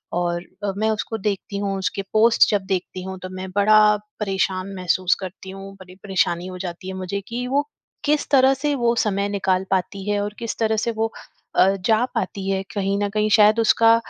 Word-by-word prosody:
और 175 0 -1 0.2
अब 200 -1 -2
मैं 220 +1 +1
उसको 220 +1 -2
देखती 200 -1 -3
हूँ, 200 -1 -2
उसके 190 +1 -2
पोस्ट 225 +2 +5
जब 200 -2 0
देखती 185 -1 -3
हूँ 190 0 -6
तो 185 - -7
मैं 185 0 -6
बड़ा 215 +1 +6 0.4
परेशान 195 -1 -1
महसूस 185 0 +1
करती 190 +1 -8
हूँ। 195 +1 -9
बड़ी 185 -1 -13
परेशानी 180 -3 0
हो 185 0 -7
जाती 180 0 -6
है 190 - -4
मुझे 190 +2 -3
कि 245 +2 -4
वो 285 +3 0 0.4
किस 295 0 +1
तरह 270 -1 +5
से 290 +2 -1
वो 235 -2 +1
समय 200 -3 0
निकाल 190 -2 0
पाती 195 +2 -1
है 205 - +1
और 205 0 -3
किस 230 -1 -4
तरह 220 -1 +2
से 235 - 0
वो 225 0 +1 0.4
अ, 185 - +6 0.2
जा 220 +1 +3
पाती 195 +1 -2
है। 190 0 0
कहीं 200 -1 0
न - - +1
कहीं 215 +1 0
शायद 215 +2 +6
उसका 225 0 +5
200 Hz, 205 wpm, -22 LUFS, 190-220 Hz, 0.4 s, बड़ा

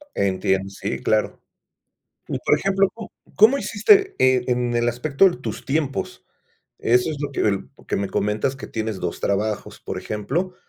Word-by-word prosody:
Entiendo, 95 0 0
sí 100 - -4
claro. 110 0 0 0.9
Y - - -2
por - - +2
ejemplo, 195 0 +2
¿cómo 225 -1 -9 0.2
cómo 225 +7 +6
hiciste, 390 - +3
eh, 130 -1 +4
en 125 -1 0
el 120 0 +1
aspecto 140 +9 +3
de 175 - -6
tus - - -6
tiempos? 140 -1 -2 0.6
Eso 125 +6 +2
es 155 - -4
lo 145 -1 -3
que - - -3
el 100 -2 0 0.2
que - - -1
me 100 0 -2
comentas 105 +7 -1
que 135 - -8
tienes 110 -3 -4
2 85 - -4
trabajos, 105 +1 -2
por - - -6
ejemplo, 150 - -3
125 Hz, 170 wpm, -22 LUFS, 105-170 Hz, 0.9 s, cómo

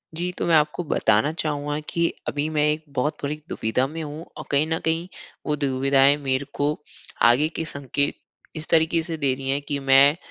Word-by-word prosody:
जी, 175 +2 -2
तो 180 - -4
मैं 165 - +4
आपको 150 +2 +2
बताना 110 -3 +2
चाहूँगा 150 -2 -2
कि 170 0 +1 0.2
अभी 145 +1 -1
मैं 150 -1 +1
एक 155 +1 -1
बहुत 145 +5 0
बड़ी 145 +2 -1
दुविधा 110 +4 0
में 160 +3 -6
हूँ। 150 +2 -7
और - - -7
कहीं 145 +2 +2
न 160 0 -1
कहीं 165 +2 0 0.4
वो 150 - +1
दुविधाएँ 135 0 +3
मेरे 135 -1 -1
को 145 +1 0 0.6
आगे 145 +6 +2
के 165 - -2
संकेत 140 -1 -1 0.4
इस 155 0 -2
तरीके 165 +1 +3
से 165 -1 -2
दे 140 -4 +1
रही 135 0 -5
है 140 +1 +1
कि, 145 0 -3
मैं 135 +2 +5
145 Hz, 200 wpm, -24 LUFS, 140-160 Hz, 0.6 s, मैं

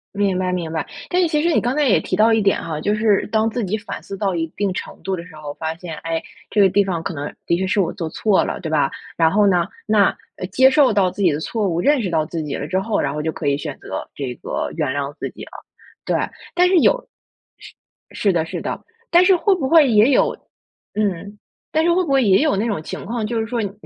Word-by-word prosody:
明 200 -2 +1
白， 185 0 -1
明 175 -3 -3
白。 160 -2 -2 0.2
但 360 - +1
是 350 - +3
其 300 -2 +1
实 340 - +2
你 - - +4
刚 245 +3 -1
才 300 - +2
也 220 - +4
提 - - -2
到 225 +2 +4
一 225 - +4
点 195 -1 +1
哈， 160 -2 -4
就 205 +6 0
是 210 -2 +2
当 220 0 +2
自 230 -1 -2
己 195 +3 -1
反 210 0 -7
思 195 - -7
到 195 -2 -1
一 165 - 0
定 200 -2 0
程 - - -7
度 195 - -2
的 170 -1 -8
时 180 -4 -14
候， 150 -1 -7
发 160 0 -3
现， 170 -2 -8
诶， 165 -1 -3 0.3
这 210 - +3
个 195 - +6
地 205 +2 +3
方 180 -4 -2
可 180 - -4
能 145 0 -5
的 170 - +2
确 190 - -1
是 190 +2 0
我 175 - -1
做 175 -4 -4
错 205 +3 +2
了， - - -3
对 160 - -4
吧？ 145 -3 +2 0.3
然 165 -1 +4
后 205 0 +4
呢， 175 -3 +3 0.2
那 210 -2 +3 0.2
呃， - - -4
接 260 +6 +6
受 270 -4 +4
到 190 -2 +3
自 - - -12
己 175 - +5
的 145 - -2
错 205 +5 -2
误， 170 0 0
认 290 +3 +3
识 190 -5 -2
到 160 -2 +2
自 160 -1 -4
己 145 -2 -5
了 145 - -4
之 185 +3 0
后， 215 +2 -1
然 - - -1
后 150 - -3
就 160 - -1
可 145 - -5
以 140 - +2
选 145 -2 -6
择 - - -6
这 130 -4 -5
个 - - -4
原 150 -5 0
谅 140 0 -2
自 - - -4
己 - - -10
了。 - - -17 0.5
对， - - 0 0.4
但 360 0 +4
是 380 - +3
有 - - +3 0.5
是 - - -13 0.4
是 200 - +1
的 165 -2 +1
是 - - -5
的， - - -4 0.3
但 350 +1 +5
是 375 0 +6
会 385 +2 +2
不 275 -7 -2
会 310 -3 +6
也 220 +3 +5
有 - - +3 0.6
嗯， 200 0 -2 0.3
但 315 - +2
是 340 - +3
会 365 +1 +2
不 280 - -3
会 270 -2 +4
也 195 +3 +4
有 305 - +2
那 215 +4 0
种 200 -8 -2
情 - - -6
况， 225 +1 -3
就 230 +1 -2
是 220 - -3
说 240 0 -2
你 200 - -3
195 Hz, 295 characters per minute, -20 LUFS, 165-230 Hz, 0.6 s, 个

